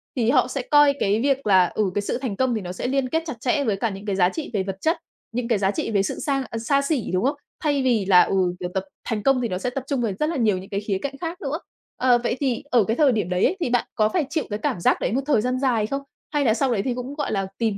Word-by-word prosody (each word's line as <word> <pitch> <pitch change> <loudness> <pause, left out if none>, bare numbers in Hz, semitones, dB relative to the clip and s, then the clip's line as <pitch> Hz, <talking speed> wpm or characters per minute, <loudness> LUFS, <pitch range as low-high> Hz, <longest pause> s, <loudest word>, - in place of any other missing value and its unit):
Thì 235 -2 +1
họ 255 -2 +4
sẽ 265 0 -3
coi 290 +1 +5
cái 205 +2 +2
việc 275 -1 +1
là, 185 -2 +6
ừ, 205 -4 +1
cái 205 - +1
sự 200 - -2
thành 250 -6 -3
công 255 -1 +1
thì 215 - -2
nó 180 -1 -6
sẽ 185 - -4
liên 265 -1 0
kết 325 +3 0
chặt 305 -6 -4
chẽ 275 +4 +1
với 215 -5 +1
cả 230 +2 0
những 195 +1 -8
cái 200 -2 -1
giá 180 -1 +4
trị 315 +6 -5
về 195 -2 0
vật 190 0 -5
chất, 325 +3 +2 0.3
những 235 0 -2
cái 230 -4 +2
giá 195 0 +2
trị 225 - -3
về 200 -2 +2
sự - - -3
sang 275 -2 0
ờ, 225 - -4
xa 280 +5 +2
xỉ, 280 -5 0
đúng 185 +4 +1
không? 280 +3 +1 0.3
Thay 285 -3 +1
vì 230 -6 +2
là, 180 -2 +7
ừ, - - -1 0.2
kiểu, 180 - -3
tập 190 0 -1 0.3
thành 215 -2 -2
công 270 -2 +3
thì 240 - 0
nó 185 -4 -3
sẽ 250 - -2
tập 260 +1 -4
trung 275 -4 -1
về 220 -4 0
rất 305 - +1
là 335 - -2
nhiều 215 -6 +2
những 190 +1 -9
cái 200 - -1
khía 205 -2 -2
cạnh 275 -1 -4
khác 340 +3 -4
nữa. 300 +1 -2 0.4
Ờ, 250 -1 +4
vậy 240 - 0
thì 265 -3 -1
ở 240 -4 +5
cái 225 +4 -1
thời 290 -4 +4
điểm 205 -6 -1
đấy 180 0 +2
ấy, 380 - +1
thì 330 - -1
bạn 240 -1 +1
có 215 0 +3
phải 325 +1 0
chịu 315 -1 -1
cái 210 +1 -3
cảm 175 - -1
giác - - +2
đấy - - 0
một 265 +4 +1
thời 285 -7 +3
gian 255 +2 -1
dài 235 -6 +1
không? 275 +2 -3 0.3
Hay 290 -2 +1
là 220 - +4
sau 260 +2 +1
đấy 205 -4 +1
thì 255 - 0
cũng, 250 +3 -6
gọi 295 - -2
là, 195 -2 -1
tìm 220 -4 0
240 Hz, 320 wpm, -23 LUFS, 205-275 Hz, 0.4 s, là